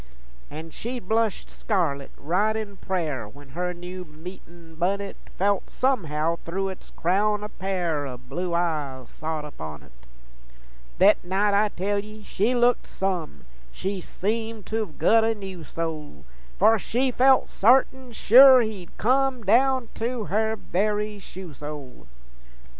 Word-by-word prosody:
An' 160 +2 -8
she'd 240 0 -6
blush 220 -1 +1
scarlit, 155 -10 -1
right 195 +8 +1
in 215 -2 -4
prayer, 155 - -2
When 140 +4 -15
her 180 +6 -2
new 180 +1 -7
meetin' 170 +1 -12
bunnet 195 +4 -1 0.2
Felt 200 0 +1
somehow 170 - 0
thru' 195 +4 -3
its 190 - -10
crown 205 +4 +1
a 210 - -5
pair 175 -8 -2
O' 125 -2 -6
blue 170 +8 -4
eyes 145 -7 -2
sot 155 -1 -4
upon 80 - -8
it. 65 - -18 1.1
Thet 200 +3 +5
night, 195 +3 +1
I 210 +1 +3
tell 200 +2 -1
ye, 215 +1 -9
she 215 +5 0
looked 245 0 +3
some! 175 - -3 0.3
She 195 - -4
seemed 220 +3 -3
to've 215 -7 -3
gut 225 0 +4
a 225 0 +1
new 190 -4 -8
soul, 155 - -5 0.3
For 220 +2 +5
she 255 +6 0
felt 260 +2 +4
sartin 255 +3 +3
sure 255 +3 +8
he'd 210 -6 -5
come, 260 +1 +2
Down 250 +3 +3
to 235 0 -1
her 220 +5 0
very 210 +1 -1
shoe 185 -4 -10
sole. 145 -2 -9
195 Hz, 140 wpm, -25 LUFS, 165-220 Hz, 1.1 s, sure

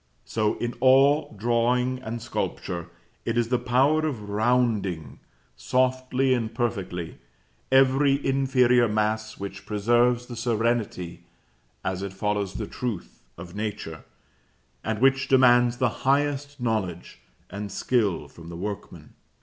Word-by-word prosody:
So, 105 -1 0
in 120 0 -3
all 135 +3 +5
drawing 120 +3 +1
and 115 -1 -5
sculpture, 85 -6 -4 0.3
it 115 +1 -2
is 115 -1 +1
the 125 -1 +2
power 135 +6 +2
of 110 -9 -5
rounding, 105 - 0 0.4
softly 130 - +1
and 115 -3 -1
perfectly, 100 -8 -3 0.5
every 135 +1 +5
inferior 130 -3 +3
mass 110 0 -1
which 100 0 -7
preserves 120 +3 +2
the 125 - -8
serenity, 115 -7 -1 0.6
as 95 0 -2
it 100 -1 -5
follows 100 0 -2
the 110 - -3
truth, 100 - -5 0.2
of 85 +2 -10
Nature, 105 -7 -5 0.8
and 110 0 -1
which 135 +3 +3
demands 125 -2 +5
the 130 -1 +2
highest 145 +1 0
knowledge 105 -8 -3 0.3
and 100 0 -5
skill 110 -8 0
from 85 0 -13
the 85 - -7
workman. 100 +3 -7
120 Hz, 125 wpm, -25 LUFS, 100-130 Hz, 0.8 s, all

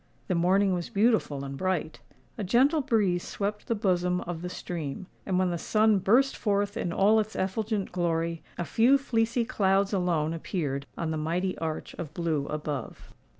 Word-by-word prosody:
The - - +2
morning 185 +3 +3
was 175 -1 -3
beautiful 205 - +1
and 135 0 -6
bright: 185 -1 -2 0.4
a 215 - -4
gentle 265 - +3
breeze 210 -9 +1
swept 210 +3 -4
the 230 - +1
bosom 180 -3 +1
of 170 -1 -5
the 180 - -4
stream:—and 180 +3 -5
when 185 -1 +2
the 170 - -2
sun 215 +1 +3
burst 250 +9 +3
forth 205 -1 0
in 175 - -2
all 205 +5 +4
its 215 0 -3
effulgent 205 +1 -1
glory, 165 -2 -1 0.2
a 175 - -2
few 235 - +4
fleecy 235 -3 0
clouds 195 -1 +1
alone 170 -4 +1
appeared 145 -5 -3
on 165 -1 -2
the 160 - -2
mighty 175 +5 -1
arch 160 -1 -4
of 155 -2 -6
blue 160 -5 -1
above. 150 -4 -5
185 Hz, 170 wpm, -28 LUFS, 165-210 Hz, 0.4 s, all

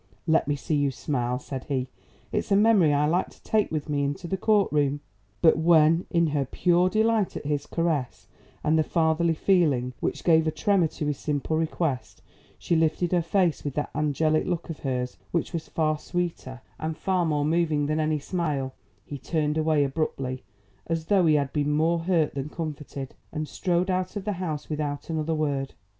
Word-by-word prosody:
"Let 160 -3 +2
me 145 - +1
see 145 - -4
you 145 -1 +2
smile," 125 -2 -2
said 130 0 -7
he. 130 -3 -1 0.4
"It's - - -2
a - - +6
memory 205 -6 +5
I 145 +1 +2
like 170 +5 +1
to - - -21
take 215 -1 +1
with 155 -2 -2
me 145 -2 0
into 145 +5 -3
the 190 - -1
court 205 +1 +2
room." 145 -1 +1 0.4
But 160 -1 +6
when 165 0 +4
in 170 -2 +2
her 145 -3 0
pure 175 +6 +2
delight 220 0 +1
at - - -8
his 145 -1 -1
caress 160 -7 -2 0.4
and 160 +1 +3
the - - +4
fatherly 165 0 +1
feeling 150 -9 +2
which - - -2
gave 160 -2 +4
a - - +2
tremor 185 +2 +2
to 150 - -5
his 145 -2 -2
simple 150 +1 -1
request, 160 -4 -2 0.3
she 170 - 0
lifted 160 +2 +1
her 180 -1 +3
face 170 -1 +1
with 145 -2 -4
that 150 - -2
angelic 155 +1 +1
look 175 -2 -2
of 160 - -8
hers 125 -2 -3
which 170 +2 -2
was 165 -2 -4
far 155 -1 0
sweeter 165 -8 -4 0.2
and 155 0 -3
far 185 -2 +1
more 150 -3 0
moving 155 -2 +1
than 155 +2 0
any 155 0 +1
smile, 145 -4 -2 0.3
he 145 - -7
turned 150 +2 -1
away 155 -2 +2
abruptly 135 -3 -2 0.4
as 165 -1 -2
though 185 -1 +3
he 155 - +5
had 140 -2 0
been 150 -1 0
more 165 +3 +2
hurt 165 -3 +1
than 140 +1 -4
comforted, 150 -4 -6 0.2
and 155 0 -3
strode 180 +2 0
out 185 +2 -2
of 205 - -4
the 210 - 0
house 155 -4 -3
without 150 0 -3
another 160 0 -1
word. 140 -3 -2
155 Hz, 195 wpm, -26 LUFS, 145-170 Hz, 0.4 s, a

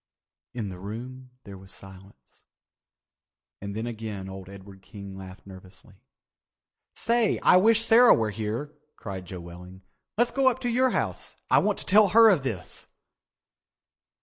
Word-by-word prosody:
In 110 -5 -4
the 90 -1 -9
room 125 +6 -8
there 100 -1 -11
was 95 0 -12
silence 95 +1 -13 1.2
and 100 0 -6
then 110 +2 -3
again 110 -4 -6
old 95 -1 -9
Edward 100 0 -13
King 100 0 -11
laughed 95 0 -11
nervously. 95 +1 -14 0.9
"Say, 230 -2 +1
I 180 - +6
wish 225 +4 +4
Sarah 235 +2 +7
was 110 -2 -1
here," 115 +8 -4 0.2
cried 95 -3 -8
Joe 90 -1 -8
Welling. 90 +2 -12 0.3
"Let's 240 +1 +2
go 270 +2 +1
up 260 - +3
to 245 - -1
your 255 +2 +2
house. - - -3 0.2
I - - +6
want - - 0
to - - -7
tell 210 +2 +5
her 225 +3 +6
of 175 -7 +1
this." 110 -9 -6
105 Hz, 150 wpm, -26 LUFS, -, 1.2 s, Sarah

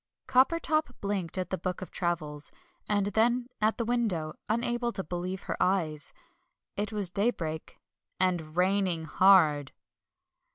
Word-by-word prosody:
Coppertop 290 +1 +2
blinked 195 -4 -2
at 185 - -3
the 190 - -1
book 180 +1 -3
of - - -10
travels, 150 -4 -3 0.4
and 205 -1 +2
then 240 +3 +2
at 215 +1 +2
the 235 - -1
window, 215 -10 0 0.2
unable 240 +1 0
to 190 - -3
believe 180 +3 -4
her - - -3
eyes. 155 -6 0 0.6
It 205 0 -2
was 205 -4 0
daybreak, 175 -6 -2 0.4
and 175 -4 0
RAINING 185 -3 +2
HARD. 160 -7 +4
190 Hz, 130 wpm, -29 LUFS, 170-220 Hz, 0.6 s, HARD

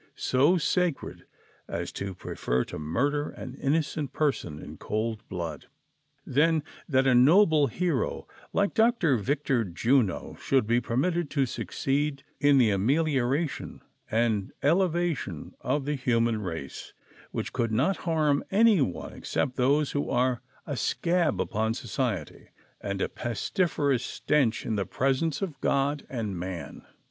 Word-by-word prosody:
So 145 +8 +3
sacred 175 -2 0
(V) - - -21 0.4
as - - -4
to 100 -1 -5
prefer 65 -7 -1
to - - -7
murder 140 - 0
an 130 - -8
innocent 145 0 -1
person 130 - -1
in - - -9
cold 110 0 -2
blood, 85 -5 -5 0.6
than 155 +3 +2 0.3
that 135 -2 +3
a 130 - +4
noble 155 +3 +6
hero, 165 +2 -1 0.3
like 200 0 +1
Dr. 220 - +3
Victor 135 +1 0
Juno, 110 +3 0
should 135 -4 +2
be 120 +2 +2
permitted 165 +7 0
to 140 -3 +1
succeed 140 +3 -2 0.2
in 145 -1 +5
the 120 -5 +5
amelioration 135 - 0 0.3
and 110 -3 +1
elevation 170 - 0
of 145 -2 -1
the 150 - 0
human 115 -4 +1
race, 80 -8 -6 0.4
which - - -4
could 115 -2 0
not 135 - +2
harm 155 -4 +1
any 210 -3 +5
one 90 -10 -2
except 125 - -2
those 140 +3 +2
who 145 - -2
are 125 -1 +1 0.2
a - - -3
scab 170 -2 +1
upon 110 +1 0
society, 115 - -3 0.3
and 100 -1 -2
a - - +1
pes 120 -3 -4
tiferous 145 -8 +1
stench 130 -6 0
in 110 - -1
the 100 - 0
presence 135 +5 0
of 155 -8 -5
God 140 +1 0
and 105 -8 -3
man. 90 -1 -6
135 Hz, 140 wpm, -27 LUFS, 110-150 Hz, 0.6 s, noble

